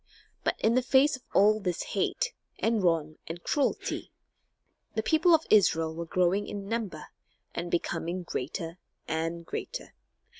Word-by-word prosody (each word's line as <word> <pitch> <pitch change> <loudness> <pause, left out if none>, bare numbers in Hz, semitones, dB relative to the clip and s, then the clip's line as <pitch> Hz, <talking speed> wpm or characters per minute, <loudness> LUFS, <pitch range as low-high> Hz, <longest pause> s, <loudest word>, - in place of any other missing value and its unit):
But - - +1
in 220 - +3
the 255 - +4
face 265 +3 +4
of 260 - -11
all 215 +2 +5
this 180 -4 -2
hate, - - 0 0.2
and 225 -1 +1
wrong, 160 -3 +1
and 170 +1 -6
cruelty, 285 -2 -1 0.8
the 220 - 0
people 325 +7 +5
of 320 - -1
Israel 165 -6 +4
were 170 +1 -4
growing 185 +4 +2
in 200 -1 -5
number, 205 -9 -3 0.4
and 175 - -3
becoming 175 +1 -1
greater 165 +3 -4 0.3
and 165 +1 -2
greater. - - -5
185 Hz, 145 wpm, -29 LUFS, 165-225 Hz, 0.8 s, all